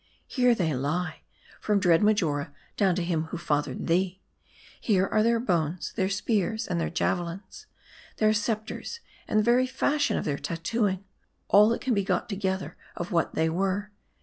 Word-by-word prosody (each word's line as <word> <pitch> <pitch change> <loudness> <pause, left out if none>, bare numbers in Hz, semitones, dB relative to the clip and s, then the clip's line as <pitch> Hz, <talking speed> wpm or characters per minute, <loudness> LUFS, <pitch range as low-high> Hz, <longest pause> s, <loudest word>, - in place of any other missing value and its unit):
Here 250 -2 +3
they 165 -7 0
lie, 150 +7 -2 0.4
from 210 -1 +1
dread 175 -4 +4
Marjora 165 -10 +1 0.2
down 190 -4 +2
to 180 - -1
him 165 -2 -1
who 165 - -6
fathered 150 -3 -1
thee. 185 +2 +1 0.6
Here 195 -4 +2
are 215 - +1
their 230 +1 +3
bones, 175 - -1
their 190 0 0
spears, 220 +2 0
and 170 -2 -1
their - - -1
javelins; 180 - -3 0.5
their 215 0 +3
scepters, 220 - -3 0.3
and 215 - 0
the 215 - +4
very 245 +3 +3
fashion 285 +3 +1
of - - -3
their 140 -2 -1
tat 165 +3 -5
tooing: 205 -2 0 0.5
all 210 +2 +7
that 230 - -1
can 260 - 0
be 200 -2 +1
got 185 -2 -1
together 190 -2 -2 0.2
of 175 - -5
what 165 -2 0
they 160 0 +2
were. 195 +4 -1
190 Hz, 175 wpm, -27 LUFS, 170-215 Hz, 0.6 s, all